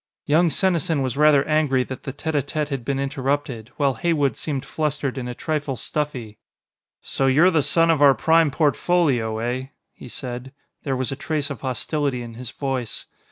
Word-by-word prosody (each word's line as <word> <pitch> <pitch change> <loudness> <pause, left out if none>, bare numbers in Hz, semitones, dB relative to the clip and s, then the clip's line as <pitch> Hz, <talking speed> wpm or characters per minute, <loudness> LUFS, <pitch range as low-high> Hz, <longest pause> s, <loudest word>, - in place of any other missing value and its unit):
Young 165 +4 +4
Senesin 165 -5 +1
was 130 -3 -2
rather 150 -1 +5
angry 150 -4 +2
that 130 0 -7
the 135 - -5
tête 155 +4 -4
á 145 - +2
tête 150 +2 -3
had 135 -4 -3
been 135 +2 -1
interrupted, 135 -4 -2
while 140 -2 +2
Heywood 145 -6 +1
seemed 140 -4 -4
flustered 150 -3 -2
and 125 -2 -4
a 125 - -5
trifle 150 -2 -2
stuffy. 125 -6 -4 0.6
"So 135 - 0
you're 155 +8 +5
the 160 -3 +3
son 165 +4 +4
of 155 -3 +1
our 140 -2 +7
Prime 165 -1 +4
Portfolio, 145 -6 +1
eh?" 125 +3 -2 0.3
he - - -12
said. 125 +1 -6 0.3
There 135 -2 -2
was 130 0 -2
a - - -2
trace 145 +1 -2
of 140 - -7
hostility 135 0 -2
in 115 -1 -9
his 120 +1 -7
voice. 130 -4 -4
140 Hz, 185 wpm, -23 LUFS, 130-155 Hz, 0.6 s, our